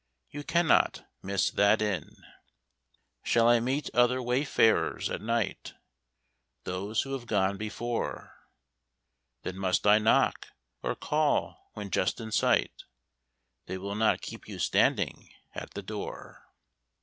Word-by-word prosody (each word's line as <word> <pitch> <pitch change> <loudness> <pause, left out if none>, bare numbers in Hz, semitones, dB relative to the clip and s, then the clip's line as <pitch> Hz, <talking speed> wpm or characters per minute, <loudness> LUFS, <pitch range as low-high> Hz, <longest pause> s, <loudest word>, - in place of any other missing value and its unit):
You 145 0 -6
cannot 170 +1 +2 0.2
miss 100 0 0
that 100 +2 +4
inn. 105 -4 -2 1.1
Shall 115 0 +3
I 120 0 +6
meet 130 +5 -1
other 125 +1 +3
wayfarers 125 -2 +1
at - - -3
night? 115 -1 -2 0.9
Those 100 +4 -2
who 135 - -6
have 125 -3 -5
gone 100 -3 +1
before. 115 +3 -4 1.1
Then 95 - -5
must 95 0 0
I 105 +1 +6
knock, 110 - +2 0.3
or - - -2
call 150 -1 -1
when 105 -2 -6
just 90 - 0
in 110 -1 -7
sight? - - +1 0.8
They 95 - -4
will 100 +2 -5
not 110 +1 +2
keep - - -9
you - - -7
standing - - +1 0.2
at - - -7
that - - -5
door. - - -7
110 Hz, 125 wpm, -29 LUFS, 100-120 Hz, 1.1 s, I